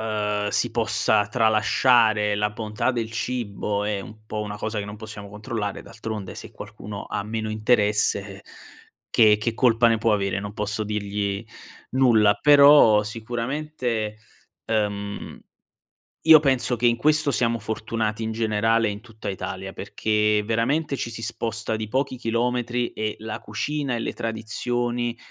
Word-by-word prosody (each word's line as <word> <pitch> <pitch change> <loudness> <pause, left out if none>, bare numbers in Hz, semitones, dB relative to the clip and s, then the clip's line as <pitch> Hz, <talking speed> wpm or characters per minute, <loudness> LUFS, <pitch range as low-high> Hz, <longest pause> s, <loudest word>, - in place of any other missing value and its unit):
ehm, 105 -1 -1
si 115 +2 0
possa 110 -2 +1
tralasciare 110 -1 +3
la 105 0 0
bontà 105 +3 -2
del 115 -2 -3
cibo 105 -3 -2
è 105 -1 -1
un 110 +2 -12
po' 110 -1 -4
una 105 0 -5
cosa 110 0 -3
che - - -4
non 105 +1 -8
possiamo 105 -2 -9
controllare, 105 0 -4
d'altronde 110 -4 -7
se - - -9
qualcuno 105 -1 -8
ha - - -2
meno 110 +1 -4
interesse 105 -3 +1 0.7
che 105 -2 +5
che 115 +1 -2
colpa 120 -1 +4
ne 115 -1 +3
può 110 0 +2
avere, 100 -1 0
non 100 0 -6
posso 105 +1 -2
dirgli 100 0 -3 0.5
nulla; 115 -5 +4
però 140 -8 +7
sicuramente, 120 0 -3 0.5
ehm, 105 -2 -3 0.9
io 160 -1 +9
penso 130 -4 +1
che 120 +1 -1
in 120 0 +2
questo 150 +2 +3
siamo 115 0 +1
fortunati 110 0 -3
in 110 - -2
generale 110 0 +1
in 105 +2 -6
tutta 110 -3 -8
Italia, 95 0 -5
perché 105 +1 0
veramente 135 +7 0
ci 120 - -4
si 115 0 -5
sposta 115 -1 -2
di 110 -1 -4
pochi 130 +2 -1
chilometri 120 +1 -1
e 110 -1 -3
la 110 0 -5
cucina 135 +5 -3
e - - -3
le - - -3
tradizioni 120 +2 -2
110 Hz, 145 wpm, -24 LUFS, 105-120 Hz, 0.9 s, io